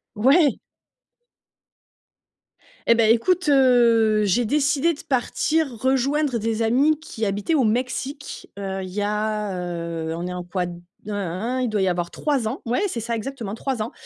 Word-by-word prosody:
Ouais. 275 +8 +4 2.3
Eh 235 - +7
beh, 225 -1 +4
écoute, 350 +8 +2
heu, 235 -5 +4
j'ai 210 +4 +2
décidé 295 +5 +2
de 300 - -10
partir 310 +3 0
rejoindre 265 +2 +1
des 225 0 -2
amis 270 +7 +3
qui 225 -7 -4
habitaient 205 +9 -1
au 275 -6 +3
Mexique. 260 +5 -3
Heu, 195 -1 -4
il 185 - -5
y 200 +3 -3
a, 210 0 -1
heu, 170 -2 -4
on 170 +1 -4
est 180 - -4
en 180 -1 -5
quoi? 180 +1 -3
Hein, 180 - -3 0.4
hein, 210 - -3 0.4
hein. - - -1
Il 250 - +1
doit 215 -3 0
y 190 - +2
avoir 175 -1 -2
3 280 -7 -1
ans. 245 +6 -4
Ouais! 240 +1 0
C'est 240 -11 -4
ça, 235 +1 -3
exactement 225 -3 -5
3 255 0 -3
ans. 215 - -3
230 Hz, 170 wpm, -23 LUFS, 205-270 Hz, 2.3 s, Eh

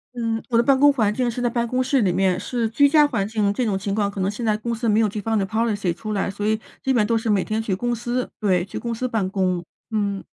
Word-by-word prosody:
嗯， 230 -1 -2
我 230 - +2
的 235 - +4
办 270 +1 +4
公 290 0 +7
环 220 -6 +1
境 245 +1 0
是 235 - -4
在 245 - +1
办 235 0 -1
公 255 +2 0
室 265 -1 +2
里 185 -3 +2
面。 185 0 +1
是 235 +2 -2
居 285 +5 +4
家 300 -1 +6
环 205 -7 -1
境， 210 -2 0
这 250 - -1
种 205 -4 0
情 195 +1 -3
况 205 -1 +1
可 200 - -7
能 190 - +1
现 230 +3 -6
在 215 -1 +1
公 235 +2 -3
司 230 0 -1
没 210 +1 +3
有 220 - +3
这 205 +1 -4
方 225 +1 0
的 195 - +1
policy 210 -4 0
出 215 +4 -5
来， 200 0 -1
所 205 +2 -4
以 220 0 +1 0.2
基 265 - +1
本 225 -5 +3
都 230 - +1
是 225 0 -1
每 200 -3 +2
天 220 +1 -2
去 200 -4 -1
公 240 +4 -1
司。 240 +2 -2
对， 185 -4 +1
去 - - -6
公 235 -1 -3
司 255 +3 -2
办 215 -6 -1
公。 185 -3 0 0.3
嗯。 200 -2 -1
220 Hz, 345 characters per minute, -22 LUFS, 200-240 Hz, 0.3 s, 公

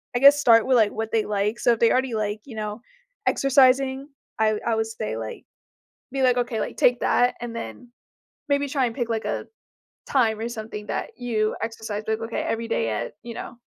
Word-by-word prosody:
I - - +2
guess, 280 +2 +8
start 230 -5 +5
with, 260 -1 +4
like, 215 -3 +4
what 220 0 -4
they 225 -1 +2
like. 210 +2 -1
So 240 - +3
if 230 - -4
they 230 - +5
already 255 -1 +1
like, 210 0 -2
you 245 - -10
know, 210 +1 -4 0.4
exercising, 270 0 +3 0.3
I 215 -1 +2
I 230 - +1
would 220 0 0
say, 110 - -4
like 110 -1 -7 0.7
be 270 -1 -1
like, 250 -1 +4
okay, 240 -2 -1
like, - - -4
take 245 0 +3
that, 245 0 +2
and 240 -1 -5
then 115 - -8 0.6
maybe 285 0 +1
try 275 -1 +1
and 230 - -4
pick, 240 -2 -2
like, 225 -1 -1
a - - -3 0.6
time 225 -5 +2
or 225 - -2
something 215 -2 -7
that - - -4
you 220 -3 -1
exercise. 220 -2 -4
Be - - -2
like, 220 - -3
"Okay. 225 +1 -3
Every 230 0 -2
day 115 - 0
at, 110 - -3
you 235 0 -7
know, - - -7
230 Hz, 215 wpm, -24 LUFS, 215-250 Hz, 0.7 s, guess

